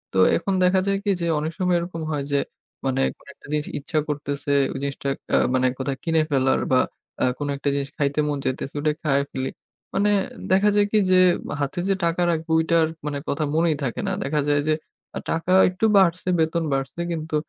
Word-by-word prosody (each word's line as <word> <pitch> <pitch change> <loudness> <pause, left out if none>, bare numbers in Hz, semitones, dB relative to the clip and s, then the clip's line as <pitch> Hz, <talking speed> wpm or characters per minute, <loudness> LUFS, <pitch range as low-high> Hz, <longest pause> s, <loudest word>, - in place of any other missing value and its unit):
তো - - +3 0.2
এখন 195 - -2
দেখা 185 +1 +4
যায় 195 - +2
কি 205 - +3
যে 170 - 0
অনেক 155 +2 -2
সময় 180 -1 +2
এরকম 170 -1 -5
হয় 145 -2 -1
যে 140 - +3 0.5
মানে 135 0 +1 0.2
কোন - - -24
একটা - - -20
জিনিস 150 0 -1
ইচ্ছা 155 +2 -1
করতেছে 145 -1 -3 0.2
ওই 135 - -5
জিনিসটা 140 0 -3 0.3
আ - - +5 0.2
মানে 130 0 +3
কোথায় 135 0 -2
কিনে 160 -1 +2
ফেলার 130 -1 +2
বা 130 - +5 0.4
আ - - +5
কোন 145 - -3
একটা 140 - -1
জিনিস 140 0 -2
খাইতে 145 -1 0
মন 145 -1 -1
চাইতেছে 130 +2 -3
ওইটা 150 +1 +1
খায় 140 -2 +2
ফেলি। 130 0 -3 0.5
মানে 205 +1 +3 0.4
দেখা 195 +2 +5
যায় 205 0 +4
কি 215 - +3
যে 185 - +6 0.4
হাতে 140 +6 -2
যে 195 - +4
টাকা 170 +1 0
রাখবো 160 0 -3
ওইটার 160 0 +3 0.2
মানে 145 -1 -2
কথা 155 +2 0
মনেই 165 -1 +3
থাকে 125 -4 -2
না। - - 0
দেখা 150 +2 0
যায় 145 0 +3
যে 155 - +4 0.6
টাকা 165 +2 -1 0.2
একটু 185 +4 -1
বাড়ছে, 185 -1 +3
বেতন 160 +1 +1
বাড়ছে 135 +5 -2
কিন্তু 160 -1 -3
155 Hz, 200 wpm, -23 LUFS, 140-170 Hz, 0.6 s, যে